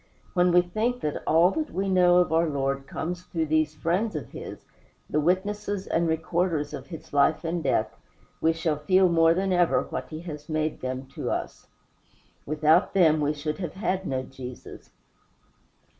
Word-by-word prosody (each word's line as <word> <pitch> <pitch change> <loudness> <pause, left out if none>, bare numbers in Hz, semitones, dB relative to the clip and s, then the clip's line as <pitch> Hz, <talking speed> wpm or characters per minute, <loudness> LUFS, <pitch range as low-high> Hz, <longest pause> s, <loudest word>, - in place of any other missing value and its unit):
When 180 -1 +3
we 175 0 +5
think 225 +7 -2
that 150 - -2
all 170 +4 +5
that 310 +5 -2
we 195 +2 -2
know 180 -2 +5
of 180 -2 +3
our 165 0 +3
Lord 135 -1 -2
comes 175 +5 -4
through 165 -3 -2
these 155 0 +1
friends 180 +6 -1
of 150 - -5
his - - -9 0.4
the 150 - 0
witnesses 200 +4 -1
and 170 +1 0
recorders 160 -1 -1
of - - -7
his 165 -4 -10
life 145 +3 +3
and 170 +1 -2
death - - 0 0.5
we 160 - +4
shall 160 -2 -1
feel 185 +4 +4
more 165 -1 +4
than 190 +1 0
ever 175 -1 +3
what - - -6
he 155 0 -7
has 150 -3 -8
made 155 0 -1
them 130 +1 -4
to - - -4
us. - - -4 0.8
Without 155 +6 +3
them 160 -5 +5
we 145 0 +2
should 150 +2 -4
have 175 -5 -4
had 190 -1 -2
no 130 -1 -1
Jesus. 130 -1 -10
165 Hz, 175 wpm, -26 LUFS, 150-180 Hz, 0.8 s, we